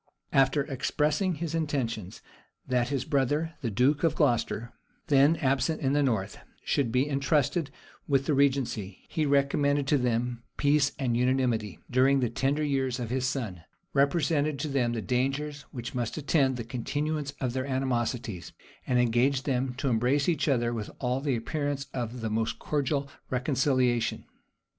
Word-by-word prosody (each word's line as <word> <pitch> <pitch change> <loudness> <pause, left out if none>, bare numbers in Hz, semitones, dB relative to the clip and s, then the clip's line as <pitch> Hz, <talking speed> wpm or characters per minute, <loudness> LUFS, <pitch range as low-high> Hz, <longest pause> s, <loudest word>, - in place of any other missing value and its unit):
After 135 +1 +4
expressing 150 +5 0
his 160 +1 -4
intentions, 130 - -2 0.4
that 125 -2 +1
his 135 -3 -1
brother, 150 +3 0
the 120 - -1
duke 130 - +2
of 165 - +2
Glocester, 120 0 0 0.4
then 140 +3 +5
absent 140 0 +1
in 135 -1 0
the 145 - +3
north, 110 -8 -1 0.3
should 130 -5 +1
be 130 +4 +2
intrusted 145 +2 +1 0.4
with 135 -2 +2
the 150 - +1
regency, 130 -8 0
he 155 -2 0
recommended 140 0 +2
to 145 - +4
them 120 0 -1 0.2
peace 145 0 +3
and 125 -4 0
unanimity 120 - +1
during 135 +2 +3
the 120 -3 0
tender 135 +5 0
years 135 -3 0
of 120 -2 -4
his 130 0 0
son; 115 - -3 0.3
represented 145 +1 +2
to 150 +3 -3
them 125 -4 +1
the 115 -2 -3
dangers 140 +4 -1
which 120 -2 -6
must 120 -2 -2
attend 140 -3 +2
the 120 - -4
continuance 145 +5 -3
of 125 -3 -1
their 130 +1 -2
animosities; 120 -7 -2 0.3
and 125 - +2
engaged 125 +3 +2
them 130 -2 -1
to 135 +2 -2
embrace 125 +4 +2
each 155 -5 +1
other 120 -4 +1
with 110 -3 -4
all 125 +1 -1
the 140 -3 0
appearance 145 +4 -2
of 120 -1 -4
the 110 - -2
most 110 +1 -1
cordial 140 -1 -1 0.2
reconciliation. 130 -2 +1
135 Hz, 155 wpm, -28 LUFS, 120-145 Hz, 0.4 s, then